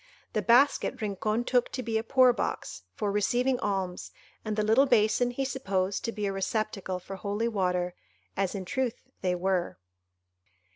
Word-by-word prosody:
The - - +1
basket 250 +5 +3
Rincon 215 +2 -1
took 250 0 +2
to 255 - -3
be 230 -2 -3
a - - -4
poor 255 +1 +5
box, 165 - -3
for 205 -1 -1
receiving 245 +5 +1
alms, 190 -3 -2 0.3
and 215 -1 -2
the 215 - +1
little 225 +6 +4
basin 220 +2 +3
he 270 +2 -2
supposed 200 -7 -1
to 230 - -1
be 210 -1 -3
a 195 - -1
receptacle 195 -1 -2
for 190 +2 -8
holy 205 +4 -1
water, 180 -4 0 0.4
as 195 0 -1
in 190 -2 -4
truth 255 +4 -2 0.2
they 180 -2 +1
were. 180 0 -1
215 Hz, 165 wpm, -28 LUFS, 190-245 Hz, 0.4 s, poor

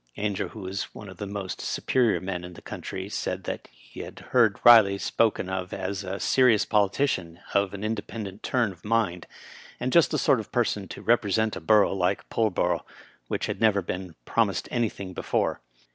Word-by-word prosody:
Ainger, 100 -2 -1
who 110 - -10
was 95 +1 -5
one 105 - -9
of 95 - -11
the 100 - -5
most 100 -2 -5
superior 120 -4 +1
men 90 -2 -4
in 90 0 -8
the - - -12
country, 95 0 -6
said 95 -2 -4 0.2
he - - -15
had - - -8
heard 115 -5 +4
Riley 110 -5 +8
spoken 110 -1 +1
of 95 -1 -4
as 95 +1 -3
a 95 +1 -4
serious 125 -5 +4
politician 100 -5 +1
of 100 -1 +1
an 100 - -7
independent 105 -2 -4
turn 120 -5 +1
of 85 -3 -16
mind, 105 -6 0 0.5
and 125 +1 -2
just 170 - +6
the 155 - 0
sort 130 - +3
of 110 - -8
person 110 -5 0
to - - -9
represent 110 -2 +2
a - - -6
borough 100 +6 +4
like 90 -3 0
Pull 110 -1 +2
borough, 90 -2 0 0.4
which - - -2
had - - -4
never 105 -3 +3
been 90 -1 -5
promised - - +1
anything 105 -5 -2
be - - -5
fore. - - 0
100 Hz, 190 wpm, -26 LUFS, 95-110 Hz, 0.5 s, Riley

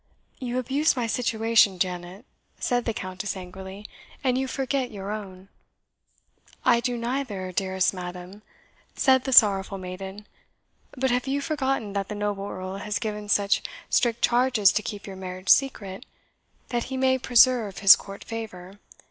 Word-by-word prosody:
"You 250 -1 -3
abuse 270 +5 +1
my 245 -2 -1
situation, 225 -4 +2
Janet," 180 +4 -4 0.3
said 245 -2 0
the 230 - 0
Countess, 185 +1 -4
angrily, 190 +2 -9 0.4
"and 255 -2 +2
you 265 +1 -1
forget 265 -1 -2
your 200 -1 -6
own." 195 -3 -7 1.2
"I 235 -1 +5
do 245 0 -2
neither, 235 -6 -3
dearest 190 0 0
madam," 180 +2 -8 0.5
said 260 -2 +3
the 265 - -2
sorrowful 200 -4 +5
maiden; 190 +2 -8 0.7
"but 260 0 +1
have 250 +2 0
you 275 +1 0
forgotten 270 -8 -2
that 200 -1 -2
the 210 - -4
noble 205 -1 -3
Earl 185 +1 -6
has 210 +1 -3
given 210 -2 -5
such 205 -1 +2 0.3
strict 235 -2 +1
charges 240 -5 +4
to 215 - 0
keep 205 -1 -6
your 195 -2 -8
marriage 185 0 -7
secret, 210 -5 +2 0.6
that 240 -1 -1
he 265 - -5
may 260 0 +2
preserve 240 -5 +4
his 195 -1 +9
court 200 0 -10
favour? 205 -4 -8
210 Hz, 150 wpm, -25 LUFS, 190-250 Hz, 1.2 s, his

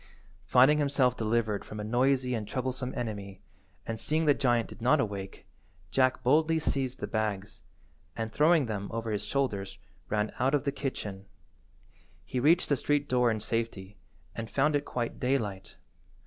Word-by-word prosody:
Finding 135 +4 +5
himself 140 -4 +2
delivered 110 -2 0
from 105 - -8
a - - -3
noisy 125 +3 +1
and 110 -3 -3
troublesome 130 +1 -3
enemy, 100 -5 -5 0.5
and 115 -1 -4
seeing 155 +5 0
the 145 - +6
giant 120 -4 +1
did - - -12
not 130 +6 +4
awake, 100 -5 -4 0.5
Jack 130 +1 +2
boldly 155 +5 +3
seized 135 -4 -1
the - - -1
bags, 105 -1 -3 0.5
and, 110 -1 -4
throwing 155 -1 +4
them 100 -3 -4
over 115 0 -3
his 105 - -2
shoulders, 115 -9 -2 0.3
ran 105 0 0
out 135 +3 +3
of 145 - 0
the 140 - 0
kitchen. 105 -9 -5 1.0
He 130 - -2
reached 160 +7 +4
the 145 - +2
street–door 135 -5 +2
in 110 -1 0
safety, 105 -4 -3 0.4
and 115 -1 -6
found 145 +2 +2
it 145 - 0
quite 120 -2 -3
daylight. 105 -8 -2
120 Hz, 160 wpm, -29 LUFS, 105-140 Hz, 1.0 s, the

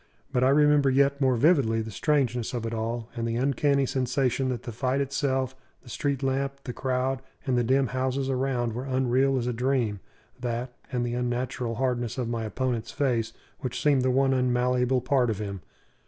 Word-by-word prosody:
But 125 - +2
I 130 - +5
remember 150 0 +5
yet 140 +1 +2
more 130 -2 +3
vividly 120 -5 +3
the 110 - -7
strangeness 125 -2 0
of 115 -1 -3
it 115 - -3
all, 115 +1 -3
and 115 -1 -2
the 115 - -1
uncanny 140 +2 +2
sensation 130 0 0
that 125 -2 -3
the 120 - -5
fight 130 +4 -1
itself, 135 -1 -1 0.3
the 125 - -14
street 140 +2 -2
lamp, 135 +1 -1
the 125 - -5
crowd, 130 +1 -1 0.2
and 130 - +1
the 120 - +2
dim 135 +3 +3
houses 130 +1 -1
around 130 -3 0
were 125 +3 -4
unreal 130 +1 +2
as 120 - -1
a 125 - -1
dream: 120 -4 0 0.4
that, 120 0 -3 0.2
and 125 -2 0
the 120 - -2
unnatural 125 -1 -2
hardness 120 -1 -1
of 125 -3 -1
my 115 -1 -2
opponent's 120 0 -2
face, 120 -5 0 0.3
which 125 - -4
seemed 145 -4 +3
the 130 - +2
one 135 +1 +3
unmalleable 125 0 +2
part 125 -1 +2
of 110 - -1
him. 100 -3 -5
125 Hz, 190 wpm, -27 LUFS, 120-135 Hz, 0.4 s, I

